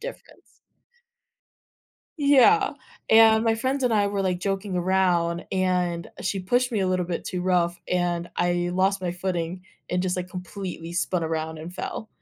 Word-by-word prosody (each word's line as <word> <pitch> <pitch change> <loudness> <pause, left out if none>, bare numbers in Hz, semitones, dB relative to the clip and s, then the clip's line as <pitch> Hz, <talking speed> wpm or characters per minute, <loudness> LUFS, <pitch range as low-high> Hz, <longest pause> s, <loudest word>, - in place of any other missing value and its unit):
difference. - - -11 1.6
Yeah. 290 - +5 0.4
And 220 0 +6
my 225 0 +3
friends 260 +4 -1
and 240 - +2
I 205 -2 +3
were, 200 -1 -1
like, 180 -1 -1
joking 195 -1 -2
around, 175 -2 +1
and 180 -2 0
she 195 0 -1
pushed 245 +6 +1
me 210 - 0
a 190 - +1
little 185 -1 0
bit 175 - -4
too 180 - -3
rough, 175 -2 +1
and 175 -1 -1
I 175 0 +1
lost 190 +1 +1
my 175 -1 -1
footing 180 -1 -3 0.3
and 180 0 0
just, 185 0 -1
like, 180 0 -4
completely 180 -2 -7
spun 180 -1 -1
around 160 0 -3
and 165 +3 -8
fell. 220 +3 -5
185 Hz, 160 wpm, -25 LUFS, 175-200 Hz, 1.6 s, And